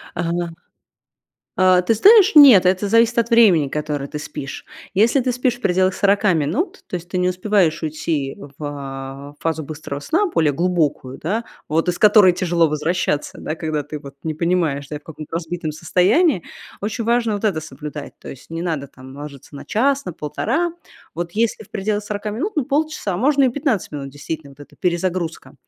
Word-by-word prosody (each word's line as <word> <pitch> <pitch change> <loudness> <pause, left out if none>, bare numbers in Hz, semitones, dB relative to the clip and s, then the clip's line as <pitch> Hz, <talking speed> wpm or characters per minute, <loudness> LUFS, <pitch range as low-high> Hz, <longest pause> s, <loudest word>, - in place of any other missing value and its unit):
Ага. 170 0 -2 1.0
А, 185 -1 +5
ты 225 - +2
знаешь, 410 - +7
нет, 265 - +9
это 185 +2 +2
зависит 230 +2 +3
от 235 +1 +1
времени, 200 -11 +5
которое 150 -1 -3
ты 150 - -5
спишь. 135 -2 -7 0.3
Если 225 +7 +3
ты 255 0 0
спишь 250 0 0
в - - -22
пределах 185 -2 +2
40 200 0 +3
минут, 180 - -1
то - - -7
есть 175 -1 -5
ты 185 - -1
не 180 0 +2
успеваешь 185 -3 +1
уйти 155 -3 -2
в, 140 0 -12
а, 140 -1 -7
фазу 160 -1 -2
быстрого 145 -1 -6
сна, 330 - +1
более 160 - +1
глубокую, 155 -5 -1
да, 215 +8 -2 0.2
вот 165 +3 0
из 175 - 0
которой 210 -3 +7
тяжело 175 -2 +1
возвращаться, 150 0 -1
да, - - -4
когда 155 -3 -3
ты 150 0 -7
вот 140 -1 -12
не 155 -1 -2
понимаешь, 160 -4 0
да, 150 - -5
и - - -5
в 145 - -28
каком-то 155 0 -7
разбитом 165 -1 -4
состоянии, 180 - +2 0.4
очень 220 +3 -3
важно 235 -1 +1
вот 205 - -5
это 190 -7 +1
соблюдать. 150 -2 -8
То - - -12
есть 135 - -11
не 165 0 -4
надо 155 -5 -3
там 130 +1 -13
ложиться 145 -1 -10
на 140 - -8
час, 275 +5 +1
на 180 - -5
полтора. 315 - -2 0.4
Вот 170 +1 -4
если 225 +1 0
в 210 - -19
пределах 210 +1 -2
40 205 0 -4
минут, 325 - -3
ну, 295 - +1
полчаса, 295 - -1
можно 275 +6 +3
и 260 - +4
15 255 - -1
минут, 140 -2 -5
действительно, 145 +1 -7
вот 140 +1 -18
эта 145 - -14
перезагрузка. 175 -1 -2
175 Hz, 190 wpm, -20 LUFS, 150-215 Hz, 1.0 s, нет